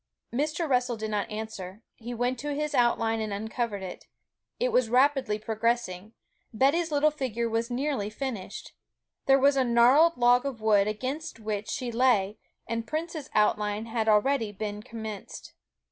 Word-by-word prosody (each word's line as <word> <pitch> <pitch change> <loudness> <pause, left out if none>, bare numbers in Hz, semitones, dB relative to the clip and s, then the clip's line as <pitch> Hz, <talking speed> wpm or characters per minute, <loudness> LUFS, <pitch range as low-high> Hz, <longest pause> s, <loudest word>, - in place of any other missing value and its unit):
Mr. 305 +6 -1
Russell 250 -3 +1
did 215 0 -4
not 210 0 -1
answer; 215 -2 -7
he 235 +1 -8
went 245 +1 -1
to 290 +1 -3
his 300 +1 -2
outline 230 -3 +2
and 215 -1 -3
uncovered 215 0 -3
it. 185 - -8 0.5
It - - +1
was 250 -3 +2
rapidly 260 -3 +3
progressing. 220 -2 -2 0.4
Betty's 290 +8 +2
little 300 +1 +3
figure 245 -6 -2
was 230 +1 -1
nearly 250 -4 -1
finished. 220 -3 -6 0.5
There 270 0 +6
was 280 +1 +4
the 270 -1 +2
gnarled 255 +7 +5
log 245 0 +4
of 275 -5 -4
wood 210 -2 +3
against 260 +7 -4
which 210 -1 -4
she 250 -2 -3
lay; 225 -4 +2 0.3
and 230 0 -3
Prince's 315 -2 -4
outline 210 0 +1
had 225 -1 -1
already 220 +1 +2
been 205 0 -5
commenced. 220 -2 -8
235 Hz, 155 wpm, -27 LUFS, 215-270 Hz, 0.5 s, There